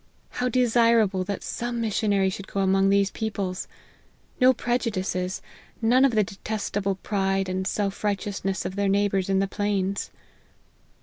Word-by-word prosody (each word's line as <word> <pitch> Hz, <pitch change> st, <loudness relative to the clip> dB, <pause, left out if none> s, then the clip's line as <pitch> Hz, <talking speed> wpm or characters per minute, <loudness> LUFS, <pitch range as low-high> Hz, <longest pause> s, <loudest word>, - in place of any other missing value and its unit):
How 250 Hz, 0 st, -1 dB
desirable 230 Hz, -5 st, +3 dB
that 200 Hz, 0 st, -4 dB
some 240 Hz, 0 st, -3 dB
missionary 205 Hz, -3 st, +1 dB
should 195 Hz, +1 st, -7 dB
go 200 Hz, -, -2 dB
among 195 Hz, 0 st, +3 dB
these 200 Hz, 0 st, +3 dB
peo 220 Hz, -, -2 dB
ple! 195 Hz, -3 st, -3 dB, 0.8 s
No 255 Hz, 0 st, +7 dB
prejudices 195 Hz, -7 st, -2 dB, 0.4 s
none 240 Hz, +3 st, +4 dB
of 250 Hz, -4 st, +2 dB
the 215 Hz, -, +4 dB
detestable 200 Hz, 0 st, -3 dB
pride 195 Hz, 0 st, -1 dB
and 185 Hz, 0 st, -2 dB
self 200 Hz, -1 st, -2 dB
righteousness 200 Hz, -2 st, -2 dB
of 185 Hz, +1 st, -4 dB
their 200 Hz, -1 st, +1 dB
neighbours 195 Hz, -1 st, +1 dB
in 195 Hz, -, +2 dB
the 195 Hz, 0 st, +2 dB
plains." 200 Hz, -1 st, -1 dB
200 Hz, 145 wpm, -25 LUFS, 195-220 Hz, 0.8 s, No